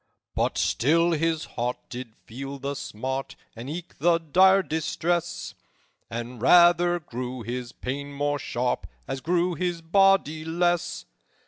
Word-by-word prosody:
"But - - 0
still 165 +6 +2
his 165 0 0
heart 120 +1 -3
did 120 -3 -7
feel 135 +4 -7
the 140 +1 -3
smart, 130 +1 -4 0.2
And 115 +4 -7
eke 170 +3 -7
the 170 +3 +4
dire 190 +4 +5
distress, 170 +2 -2 0.6
And 120 0 -6
rather 175 +3 +6
grew 125 -4 -6
his 120 +1 -5
pain 140 +3 -5
more 145 +1 -1
sharp 125 -1 -2 0.2
As 135 0 -4
grew 175 +2 +1
his 170 0 -2
body 185 -3 +3
less. 175 +1 0
155 Hz, 130 wpm, -26 LUFS, 130-175 Hz, 0.6 s, rather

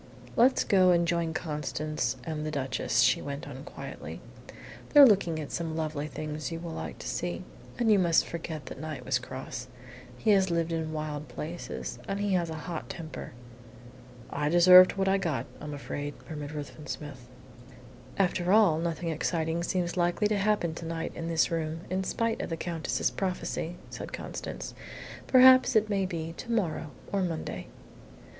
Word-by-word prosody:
"Let's 250 +3 +5
go 185 -2 +5
and 170 -1 +4
join 170 -1 0
Constance 150 -4 -2
and 155 -2 -4
the 155 - -2
Duchess," 135 -4 0
she - - +4
went 140 0 -5
on, 135 -1 -8
quietly. - - -8 0.7
"They're 290 -1 +10
looking 185 -8 +3
at 150 - -6
some 165 -2 -3
lovely 155 -2 -2
things 155 +1 -5
you 165 - -4
will 170 0 -6
like - - -5
to - - -7
see. - - -3 0.3
And 235 -3 +3
you 205 - +6
must 170 -3 +4
forget 160 -4 -6
that 130 - -8
Knight 155 -1 -6
was 130 -1 +1
cross. 125 -1 -7 0.5
He 215 - +2
has 190 -2 +4
lived 170 -1 0
in 160 -1 -2
wild 155 -1 -4
places, 170 +3 -6
and 195 - -2
he 205 -1 0
has 175 -2 +1
a 160 - -4
hot 170 -3 -5
temper." 160 -3 -7 1.0
"I 150 0 0
deserved 180 +2 +9
what 195 0 0
I 195 +1 +3
got, 150 -10 -1
I'm 150 - -6
afraid," 145 0 -5
murmured 150 -1 -6
Ruthven 150 +1 -7
Smith. 135 -5 -7 0.9
"After 180 -1 +1
all, 200 -7 +5
nothing 165 0 -2
exciting 160 +1 -1
seems 175 0 -1
likely 175 +3 +2
to 210 - +1
happen 200 -5 +1
to 165 - -7
night 165 0 -3
in 165 - -5
this 165 0 +2
room, 165 0 -2
in 190 +1 0
spite 230 +4 -1
of - - -4
the 165 - -2
Countess's 165 -1 -1
prophecy," 180 -2 -3 0.2
said - - -6
Constance. - - -6 0.5
"Perhaps 255 -1 +7
it 215 0 +3
may 195 -2 +1
be 165 -2 -4
to 235 - -6
morrow 170 -8 0 0.2
or 200 - +1
Monday." 170 -3 -3
165 Hz, 175 wpm, -29 LUFS, 155-185 Hz, 1.0 s, They're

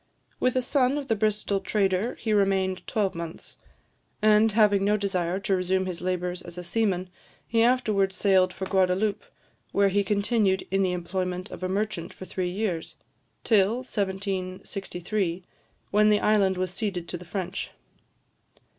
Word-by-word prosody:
With 255 0 +1
a 255 - +2
son 265 +1 +2
of 280 -2 -5
the 225 - +3
Bristol 210 -1 0
trader 195 +2 0
he 220 - -2
remained 190 -2 +1
twelvemonths; 170 -6 -3 0.6
and, 215 0 +5
having 205 -2 +4
no 210 +1 +3
desire 185 -3 -1
to 195 0 +1
resume 185 +1 0
his 180 -2 -5
labours 180 0 -2
as 175 -1 -10
a 180 - -5
seaman, 185 -1 0 0.4
he 230 -1 +2
afterwards 215 -6 +2
sailed 185 -1 +3
for 190 - -5
Guadaloupe, 190 +2 +1 0.5
where 200 0 +3
he 200 +1 +2
continued 200 -1 +1
in 195 0 +2
the 185 -2 +2
employment 180 +1 -3
of - - -8
a 185 - -2
merchant 195 -3 -2
for 185 - -9
three 185 -1 -2
years, 180 -3 -3 0.5
till 210 -1 +4
1763, 190 -2 -3 0.5
when 210 +1 +5
the 210 -1 +4
island 200 -3 +3
was 185 0 -2
ceded 190 -4 -3
to - - -4
the - - -10
French. 185 +1 -4
195 Hz, 155 wpm, -26 LUFS, 185-210 Hz, 0.6 s, and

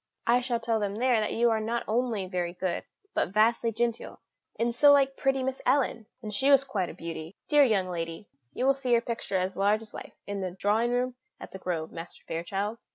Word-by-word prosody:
I 245 +1 +4
shall 240 -2 -1
tell 225 -1 0
them 200 -1 -2
there 245 0 +2
that 215 - -1
you 235 0 +3
are 220 - +1
not 230 +2 -2
only 225 -3 0
very 180 -2 -3
good, 185 -1 -2 0.3
but - - 0
vastly 225 +3 +2
genteel, 235 +1 -2 0.4
and 235 +1 0
so 285 +4 +6
like 275 -1 +4
pretty 270 -1 +1
Miss 265 0 -3
Ellen 250 -4 +1 0.2
and 210 -1 -5
she 270 +7 +2
was 275 -1 +6
quite 210 -10 -2
a - - -9
beauty 165 +1 -7
dear 295 -1 +6
young 205 -8 +2
lady! 165 +2 -5 0.2
You 250 - -2
will 275 - +5
see 260 -2 -1
her 230 - +3
picture 230 -5 -3
as 185 +1 -1
large 205 +3 +2
as 215 - -13
life - - -9
in 200 -1 -4
the 185 - -2
drawing 205 +6 +1
room 250 +1 -1 0.2
at - - -10
The 190 - -8
Grove, 165 -4 -3
Master 165 +1 -9
Fairchild." 195 +7 -3
225 Hz, 225 wpm, -28 LUFS, 190-245 Hz, 0.4 s, so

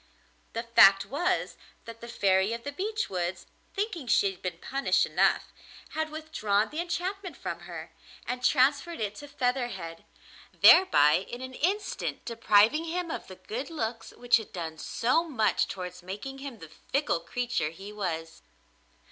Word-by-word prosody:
The 230 - -2
fact 195 -4 +6
was 355 +7 -1 0.3
that 230 0 -10
the 235 - -8
Fairy 195 -2 +2
of 230 0 -5
the 285 - -4
Beech 430 +8 -2
Woods, 180 -1 -3 0.3
thinking 390 - -3
she 200 -3 +3
had 185 - -15
been 180 - -4
punished 275 +1 +1
enough, - - +1 0.4
had 315 0 -2
withdrawn 225 -10 -1
the 305 - -4
enchantment 360 +2 -4
from - - -5
her, - - -9 0.3
and 250 0 -4
transferred 285 +6 +3
it 210 -2 -2
to 290 - -9
Featherhead, 245 -11 -2 0.5
thereby 155 - +6
in 240 - -6
an 260 0 -7
instant 390 +10 -2
depriving 230 +6 +3
him 340 0 -3
of - - -5
the 185 - -10
good 220 - -6
looks 230 -8 -4
which 245 0 +4
had 220 - -8
done 160 -3 -6
so 255 - +1
much 245 -10 +1
towards 180 -1 -6
making 205 +9 -7
him 270 -4 -7
the 165 -4 -11 0.2
fickle 275 - +1
creature 240 -1 -2
he 195 +6 -10
was. 165 -5 -4
235 Hz, 155 wpm, -28 LUFS, 195-300 Hz, 0.5 s, fact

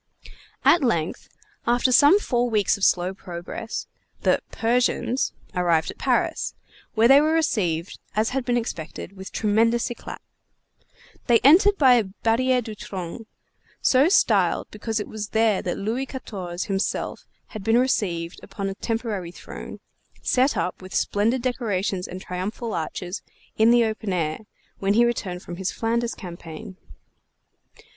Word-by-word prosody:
At 345 - +6
length, 170 -10 -1 0.4
after 245 +2 +3
some 290 +10 +7
four 245 -9 0
weeks 210 -3 +2
of 200 - -8
slow 180 0 +3
progress, 185 +4 -6 0.4
the - - +3
"Persians" 245 +2 +1 0.2
arrived 170 -3 +1
at - - -16
Paris, - - 0 0.4
where 225 +1 +5
they 275 +3 +8
were 310 +1 +2
received, 190 - 0 0.2
as 215 +1 +2
had 265 0 -1
been 245 -1 +1
expected, 190 -4 -5
with 190 0 -9
tremendous 225 +2 +2
éclat. 240 - -7 1.1
They 240 -2 +6
entered 385 +8 +6
by 255 -4 +6
Barriére 230 +5 +1
du 220 -1 -7
Trône, 205 +1 -7 0.5
so 275 +5 +4
styled 390 - +3
because 220 +1 -3
it 210 - -4
was 215 -1 -5
there 220 -3 +2
that 175 - -3
Louis 235 +7 -2
Quatorze 190 -9 -5
himself 195 0 -2 0.2
had 215 - -7
been 225 +3 +3
received 180 -9 0
upon 200 -1 -5
a - - -3
temporary 220 -4 -3
throne, - - -9 0.4
set 260 +2 +2
up, 180 - -2
with 185 0 -9
splendid 230 +5 +1
decorations 205 -7 -1
and 185 - -7
triumphal 200 +6 -4
arches, 175 +3 -4 0.3
in 220 +1 +5
the 240 -1 +5
open 215 -2 -3
air, 155 -3 -1 0.4
when 200 +1 +1
he 240 +1 +5
returned 190 -7 -2
from 175 - -7
his 190 -1 -2
Flanders 235 +1 -1
campaign. 170 -1 -9
220 Hz, 145 wpm, -24 LUFS, 185-240 Hz, 1.1 s, they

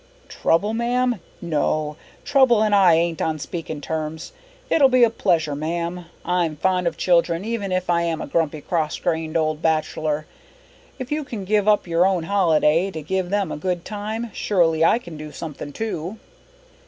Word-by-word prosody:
Trouble, 205 +6 +1
ma'am? 245 0 0 0.2
No, 155 -2 -1 0.3
trouble 260 -6 +4
and 210 -1 +1
I 190 -4 +6
ain't 165 0 0
on 160 -1 0
speaking 155 0 -6
terms. 160 +1 -4 0.4
It'll 275 -4 +5
be 255 -1 +5
a 230 - +5
pleasure, 160 -8 +1
ma'am. 170 +3 -3 0.2
I'm 175 -3 0
fond 180 +2 +1
of 165 -1 -2
children 170 +1 +2
even 220 -4 -3
if 185 0 -1
I 170 -1 +2
am 165 -2 -1
a - - -4
grumpy 155 0 -1
cross 160 -3 -1
grained 160 0 -1
old 155 -1 0
bachelor. 155 -1 0 0.7
If 255 0 -7
you 300 0 -1
can 220 -8 -6
give 210 +1 +1
up 210 -1 +4
your 170 0 +2
own 185 -4 0
holiday 165 -2 +2
to 160 -5 -7
give 185 +2 -2
them 200 -4 0
a - - -4
good 175 +2 -2
time, 215 +2 -4
surely 165 -5 +2
I 165 - +5
can 175 -10 -9
do 150 0 -8
something 150 -2 -7
too." 200 +1 -4
170 Hz, 175 wpm, -22 LUFS, 160-205 Hz, 0.7 s, I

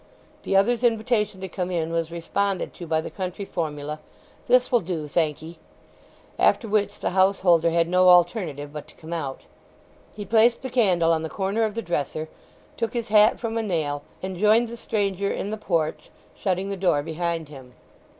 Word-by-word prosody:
The 195 - -1
other's 235 +5 +2
invitation 220 -4 +1
to 190 - -4
come 180 0 -4
in 165 -2 -2
was 165 -1 -1
responded 185 +3 -2
to 175 - -9
by 160 0 +1
the - - -7
country 190 +1 -5
formula, 150 -4 -4 0.5
"This 250 +1 +4
will 240 - +5
do, 165 -5 -4
thank 155 0 0
'ee," 165 +1 -10 0.8
after 230 - +3
which 205 -1 0
the - - -1
householder 185 -3 +3
had 165 0 +2
no 185 +1 +4
alternative 175 -5 +2
but 150 -1 -7
to - - -19
come 165 +1 -8
out. 140 -5 -4 0.7
He 205 -1 -6
placed 230 +4 +3
the 260 - -5
candle 180 -9 +3
on 160 - 0
the 160 - -4
corner 195 +5 -1
of 215 -1 -4
the 230 - -3
dresser, 155 -1 -3 0.5
took 230 -1 -2
his 235 -3 -3
hat 210 +1 +5
from 230 -1 -2
a - - 0
nail, 155 -8 -2 0.2
and 190 -1 -4
joined 215 +4 +4
the 235 - -7
stranger 200 -3 -1
in 205 - -3
the - - -1
porch, 165 -7 -2 0.3
shutting 190 0 -1
the 200 - -3
door 175 -6 +2
behind 165 0 -3
him. 130 -4 -13
185 Hz, 190 wpm, -24 LUFS, 165-210 Hz, 0.8 s, will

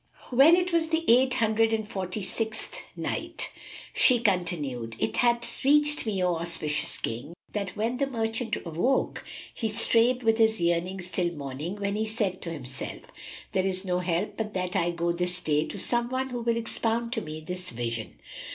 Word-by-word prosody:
When 275 +7 +7
it 360 0 0
was 330 -1 +3
the 325 +1 0
Eight 255 +2 +5
Hundred 225 -2 +3
and 220 -1 -1
Forty 190 -1 -4
sixth 220 +3 -2 0.2
Night, - - -4 0.4
She 250 -2 +5
continued, 150 - -1
It 110 0 -1
hath 240 -1 +1
reached 295 -1 +4
me, 195 -4 0
O 175 -2 +2
auspicious 165 -3 0
King, 125 +9 -5 0.2
that 200 -3 -3
when 230 +4 0
the 275 +1 +1
merchant 225 -2 -1
awoke, 175 +12 0 0.3
he 225 - -2
strave 235 +3 +3
with 225 0 +3
his 220 -1 +4
yearnings 175 +2 0
till 175 -2 +1
morning 145 +5 -5
when 200 0 -2
he 220 +1 -1
said 210 -4 -1
to 170 - -4
himself, 130 -4 -7 0.4
"There 190 - +1
is 190 0 -1
no 180 -1 0
help 180 +2 -1
but 215 -2 -3
that 180 -1 -2
I 170 - +2
go 170 0 0
this 180 +1 0
day 150 -3 +1
to - - -6
some 240 +4 0
one 260 +1 -1
who 245 -1 -4
will 230 0 +1
expound 230 +1 -1
to 225 - -1
me 155 -3 -6
this 180 +3 -4
vision." 115 -1 -4
205 Hz, 180 wpm, -27 LUFS, 170-235 Hz, 0.4 s, When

